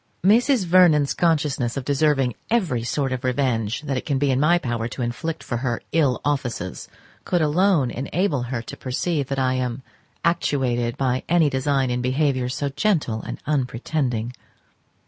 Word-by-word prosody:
Mrs. 230 +3 +4
Vernon's 165 -5 +5
consciousness 145 -7 0
of 135 - -4
deserving 140 -3 +2 0.2
every 180 - +1
sort 135 +2 -1
of 130 +1 -4
revenge 125 -3 0
that 140 -3 -2
it - - -4
can 140 -3 +1
be 140 0 +1
in 130 - +1
my 160 +4 +4
power 120 -7 -2
to 125 +1 -5
inflict 125 +7 -4
for 120 - -3
her 120 -1 -2
ill 145 -6 +2
offices 125 -10 -3 0.3
could 175 - 0
alone 155 -3 +2
enable 145 +2 -1
her 120 -1 -4
to - - -8
perceive 140 +2 -2
that 135 - -3
I 130 -1 +1
am 130 0 -2 0.4
actuated 125 -8 0
by 130 -1 0
any 165 -3 +4
design 135 -1 +1
in 125 0 -1
behaviour 130 0 0
so 140 +2 -2
gentle 140 - 0
and - - -7
unpretending. 125 -3 -1
135 Hz, 165 wpm, -23 LUFS, 125-155 Hz, 0.4 s, Vernon's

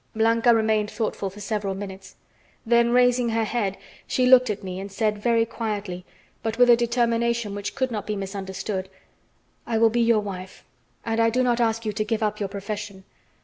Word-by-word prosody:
Blanca 230 +2 +3
remained 220 -2 +2
thoughtful 215 -2 -3
for 200 +2 -13
several 205 -2 -2
minutes; 195 -1 -8 0.5
then, 235 0 +4
raising 245 0 +3
her 225 0 +1
head, 210 -3 -1 0.3
she 255 - +1
looked 255 -1 +6
at 210 -1 -3
me 185 -1 -5
and 195 +1 -7
said 210 +1 -1
very 230 +1 +2
quietly, 210 -5 -4 0.4
but 225 0 -3
with 245 -1 +6
a - - +8
determination 235 -2 0
which 205 0 -5
could 260 -1 -1
not 215 -3 -4
be 210 - -1
misunderstood: 195 0 -4 0.8
"I 225 - 0
will 225 0 +4
be 240 +1 +1
your 230 -2 +3
wife, 185 -2 -8 0.4
and 225 0 -1
I 230 0 +4
do 250 +3 +1
not 240 -1 +1
ask 225 0 0
you 215 - -1
to 215 +1 -1
give 220 0 -1
up 210 0 -1
your 200 -2 -2
profession. 200 -1 -6
220 Hz, 190 wpm, -24 LUFS, 200-235 Hz, 0.8 s, a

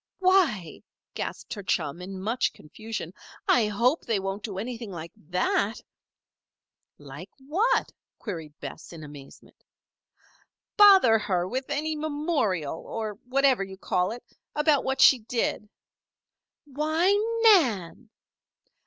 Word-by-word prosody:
"Why!" 350 - +2 0.3
gasped - - -5
her 205 - -6
chum, 170 -3 -2
in 190 +1 -7
much 225 +6 -1
confusion, 215 +1 -7 0.3
"I 230 -4 +4
hope 240 +9 +1
they 225 -4 0
won't 195 +1 -4
do 205 -3 -6
anything 230 +1 -5
like 170 -2 -7
that." 185 +5 -1 1.2
"Like 145 +6 -11
what?" 360 - 0 0.3
queried 160 -8 -7
Bess, 145 +2 -9
in 160 -2 -10
amazement. 145 -2 -14 1.1
"Bother 385 - +7
her 185 -4 -1
with 260 +6 -4
any 310 +2 -1
memorial 290 - -1
or 215 -2 -6
whatever 265 -4 +3
you 190 0 -9
call 180 0 0
it 240 +2 -8 0.3
about 300 -2 +3
what 265 0 -1
she 260 - +7
did." 220 -2 -2 1.0
"Why, 310 +6 +1 0.3
Nan!" 240 - +3
220 Hz, 120 wpm, -26 LUFS, 185-280 Hz, 1.2 s, Bother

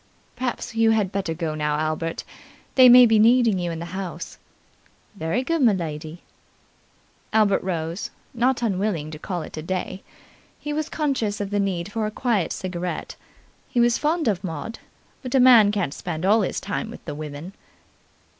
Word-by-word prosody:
"Perhaps 245 -2 -3
you 225 0 +3
had 215 -4 +2
better 190 -5 -2
go 160 -2 -3
now, 150 -1 -1
Albert. 155 +1 -2 0.5
They 255 -1 +8
may 250 0 +9
be 225 -2 +4
needing 230 -3 +4
you 175 -1 -2
in 165 - -4
the 165 - -5
house." 185 -3 -6 0.8
"Very 195 +7 -1
good, 330 +3 0
m'lady." 165 - 0 1.1
Albert 215 -2 +3
rose, 170 -1 -3 0.2
not 245 +1 +1
unwilling 190 -7 -1
to 155 - -8
call 175 -1 -4
it - - -9
a - - -3
day. 185 +3 -4 0.6
He 295 - -5
was 310 +1 -2
conscious 260 -9 -1
of 200 -1 -4
the 205 - +1
need 195 -1 -2
for 220 0 -1
a - - -2
quiet 215 -4 0
cigarette. 180 -1 -4 0.5
He 245 - 0
was 240 0 +3
fond 315 0 0
of 195 -3 0
Maud, 170 +5 -5 0.4
but 255 0 -3
a - - +5
man 240 -5 +7
can't 200 -9 -1
spend 170 -1 -4
all 215 +3 +4
his 190 - -1
time 205 +3 -4
with 235 - -11
the 150 - -5
women. 150 +4 -7
200 Hz, 175 wpm, -23 LUFS, 170-235 Hz, 1.1 s, may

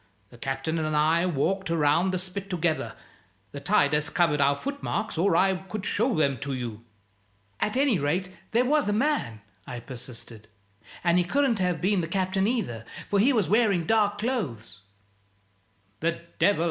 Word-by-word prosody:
The 120 - -14
Captain 135 +4 -2
and 155 -1 -1
I 160 +4 +3
walked 185 +4 0
around 165 +2 +3
the 185 - 0
spit 190 +2 -5
together 170 -3 -1 0.6
the - - -6
tide 145 +1 +2
has 150 0 +1
covered 160 -5 +2
our 140 +1 +4
footmarks 270 - -3
or 170 +2 +2
I 190 +2 +4
could 190 +2 -6
show 230 +2 +1
'em 140 -5 +1
to 140 +1 -4
you." 115 -3 -5 0.8
"At 210 +4 0
any 265 - +3
rate 175 +6 -1 0.2
there 240 +3 +2
was 290 -3 +2
a - - +1
man," 220 - 0 0.3
I 125 - -5
persisted. 120 -3 -9 0.6
"And 175 0 +4
he - - +3
couldn't 255 +3 +1
have 180 -4 0
been 195 0 +2
the 165 - -3
Captain 190 +2 0
either, 185 - -2 0.3
for 200 - +3
he 245 +8 +5
was 215 - +2
wearing 200 -4 +3
dark 210 0 +2
clothes 145 - -3 0.6
" 100 0 -40
"The 170 +1 -1 0.2
devil! 205 - +4
175 Hz, 170 wpm, -26 LUFS, 140-205 Hz, 0.8 s, he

